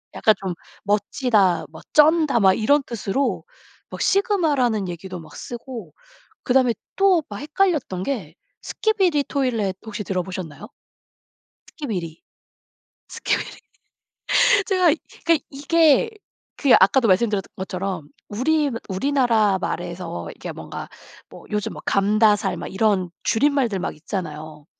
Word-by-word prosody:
약간 215 - +4
좀 180 -2 -3 0.3
멋지다, 205 -2 +1
뭐 160 - -11
쩐다 305 -4 +5
막 190 -1 +6
이런 285 +7 +3
뜻으로 235 +3 -2 0.5
막 - - -6
sigma 390 -7 +2
라는 220 -7 0
얘기도 180 +1 -7
막 155 - -14
쓰고 235 - -8 0.5
그다음에 250 -2 +3 0.2
또 385 -4 +4
막 205 - -6
헷갈렸던 300 - 0
게 190 - -4 0.3
Skibidi 375 -9 +1
Toilet 230 -10 -1
혹시 210 -1 -5
들어보셨나요? 185 -3 -5 1.0
Skibidi 180 - -5 0.9
Skibidi - - -2 1.1
제가 365 -5 +3 0.3
그러니까 330 -2 +2
이게 315 - +3 0.5
그 275 - +2
아까도 230 +5 +4
말씀드렸던 200 0 +2
것처럼 185 -4 -4 0.2
우리 290 +7 +1 0.2
우리나라 225 -3 +2
말에서 170 - -4
이게 - - -7
뭔가 - - -8 0.4
뭐 - - -13
요즘 210 -1 -2
막 - - -10
감다살 205 0 +2
막 - - -6
이런 190 -3 +1
줄임말들 240 -5 +1
막 - - -4
있잖아요. 155 -3 -6
215 Hz, 305 characters per minute, -22 LUFS, 190-285 Hz, 1.1 s, 막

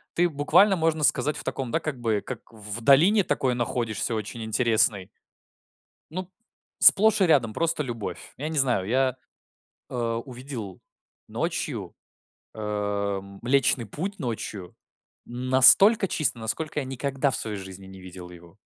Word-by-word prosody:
Ты 175 +1 +3
буквально, 165 +7 +3
можно 160 -2 0
сказать, 150 +1 +1
в - - -4
таком, 130 -3 -4
да, 165 - +1
как 150 -6 -5
бы 110 -3 0
как 125 -4 -6
в 105 +1 -6
долине 170 - +5
такой 130 -6 0
находишься 115 -2 -2
очень 110 +2 -5
интересной. 110 -3 +2 1.0
Ну 185 +3 -4
п 180 - -31 0.5
сплошь 215 0 +6
и - - +5
рядом 130 -10 +2
просто 165 0 -1
любовь. 115 -5 -7
Я 150 +4 -4
не 160 - -4
знаю, 120 -8 +1
я, 130 +1 +1 0.7
а, 115 -2 -2
увидел 120 -6 -8 0.5
ночью, - - -4 0.6
эм, 100 -2 -4
Млечный 130 -1 +2
Путь 185 - -6
ночью 110 - -6 0.5
настолько 130 - +5
чисто, 150 -8 0
насколько 150 +8 -3
я 135 - -4
никогда 135 +1 -2
в - - +1
своей 105 -2 -3
жизни 95 0 -10
не 95 -1 -12
видел 90 -1 -10
его. 85 -1 -16
125 Hz, 145 wpm, -25 LUFS, 105-150 Hz, 1.0 s, сплошь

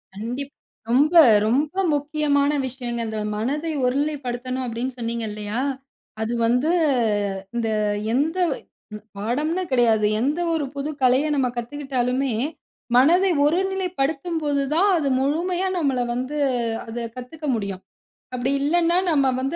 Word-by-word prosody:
கண்டிப் 250 +7 -5 0.4
ரொம்ப 285 +7 +3 0.3
ரொம்ப 285 +7 +1 0.2
முக்கியமான 290 -1 +1 0.2
விஷயங்க, 245 -2 -5
அந்த 220 0 -4 0.2
மனதை 290 +9 -2
ஒருநிலைப்படுத்தணும் 255 -2 -2
அப்டின்னு 245 +2 -4
சொன்னீங்கல்லியா? 220 -2 -3 0.6
அது 220 +2 -1
வந்து 250 +7 +2 0.8
இந்த 230 -1 0 0.4
எந்த 305 +7 +1 0.8
பாடம்னு 300 - -1
கிடையாது, 230 -4 +4 0.2
எந்த 290 +7 0
ஒரு 315 -3 0
புது 280 +2 -3
கலைய 255 +3 +4
நம்ம 265 -3 +2
கத்துக்கிட்டாலுமே, 260 0 -1 0.7
மனதை 350 +9 +5
ஒருநிலைப்படுத்தும் 345 -2 -1
போது 285 -1 +1
தான் 390 +5 +4
அது 300 -4 -1
முழுமையா 350 +7 0
நம்மள 275 -6 0
வந்து 255 +5 -3 0.5
அத 225 +1 -7 0.2
கத்துக்க 275 +5 -8
முடியும், 200 -4 -4 0.5
அப்டி 250 +2 -1
இல்லன்னா 340 +4 +2
நம்ம 275 -4 +3
வந்து 270 +5 -2
275 Hz, 115 wpm, -23 LUFS, 245-305 Hz, 0.8 s, மனதை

